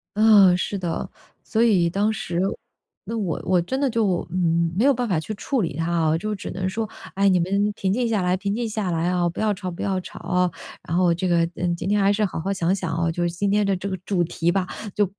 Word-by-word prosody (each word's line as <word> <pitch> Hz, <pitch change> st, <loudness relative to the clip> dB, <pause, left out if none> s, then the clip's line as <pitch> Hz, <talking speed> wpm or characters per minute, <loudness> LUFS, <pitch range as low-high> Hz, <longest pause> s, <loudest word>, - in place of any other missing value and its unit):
嗯， 205 Hz, -4 st, +6 dB
是 200 Hz, +2 st, -2 dB
的。 175 Hz, -3 st, -3 dB, 0.3 s
所 225 Hz, +1 st, +1 dB
以 190 Hz, -7 st, +4 dB
当 205 Hz, +5 st, +1 dB
时， 175 Hz, -4 st, -3 dB, 0.7 s
那 230 Hz, -, -4 dB
我 190 Hz, -7 st, -2 dB
我 185 Hz, 0 st, +3 dB
真 260 Hz, +10 st, -3 dB
的 280 Hz, -, +2 dB
就， 210 Hz, -7 st, 0 dB
嗯， 170 Hz, -2 st, +1 dB
没 225 Hz, -, +3 dB
有 280 Hz, -, +6 dB
办 245 Hz, -1 st, -2 dB
法 175 Hz, -5 st, +2 dB
去 190 Hz, +7 st, -5 dB
处 245 Hz, +5 st, -1 dB
理 165 Hz, -7 st, -2 dB
它 165 Hz, +2 st, -2 dB
啊， 160 Hz, -2 st, +2 dB
就 215 Hz, +5 st, -3 dB
只 195 Hz, -, -7 dB
能 185 Hz, 0 st, -2 dB
说： 220 Hz, +3 st, -3 dB, 0.3 s
“哎， 200 Hz, +1 st, +3 dB
你 185 Hz, -2 st, +4 dB
们 200 Hz, +4 st, +1 dB
平 190 Hz, -1 st, -1 dB
静 240 Hz, +4 st, +1 dB
下 220 Hz, -4 st, +1 dB
来 180 Hz, 0 st, +1 dB
平 200 Hz, +1 st, -2 dB
静 235 Hz, 0 st, -2 dB
下 210 Hz, -4 st, -2 dB
来 165 Hz, +1 st, 0 dB
啊， 180 Hz, -1 st, +1 dB
不 170 Hz, -, -5 dB
要 215 Hz, -1 st, +2 dB
吵 190 Hz, -1 st, -5 dB
不 170 Hz, -, -8 dB
要 190 Hz, -1 st, 0 dB
吵 -, -, -10 dB
啊”， 180 Hz, 0 st, 0 dB, 0.4 s
然 165 Hz, -, -1 dB
后 180 Hz, -1 st, +4 dB
这 175 Hz, +2 st, -2 dB
个， 170 Hz, -1 st, +3 dB
嗯， 175 Hz, -1 st, -1 dB
“今 175 Hz, +2 st, -4 dB
天 210 Hz, 0 st, +3 dB
还 200 Hz, +1 st, +4 dB
是 210 Hz, +1 st, 0 dB
好 190 Hz, -5 st, -2 dB
好 195 Hz, +4 st, -1 dB
想 180 Hz, -1 st, +1 dB
想 175 Hz, -4 st, -3 dB
啊， 165 Hz, 0 st, 0 dB
就 175 Hz, +1 st, -2 dB
是 175 Hz, -, +1 dB
今 195 Hz, +4 st, -1 dB
天 210 Hz, 0 st, +3 dB
的 195 Hz, -1 st, +1 dB
这 185 Hz, +2 st, -4 dB
个 190 Hz, -, -3 dB
主 185 Hz, -4 st, +1 dB
题 170 Hz, 0 st, 0 dB
吧， 190 Hz, 0 st, 0 dB, 0.3 s
就 205 Hz, -, +3 dB
185 Hz, 280 characters per minute, -23 LUFS, 175-205 Hz, 0.7 s, 嗯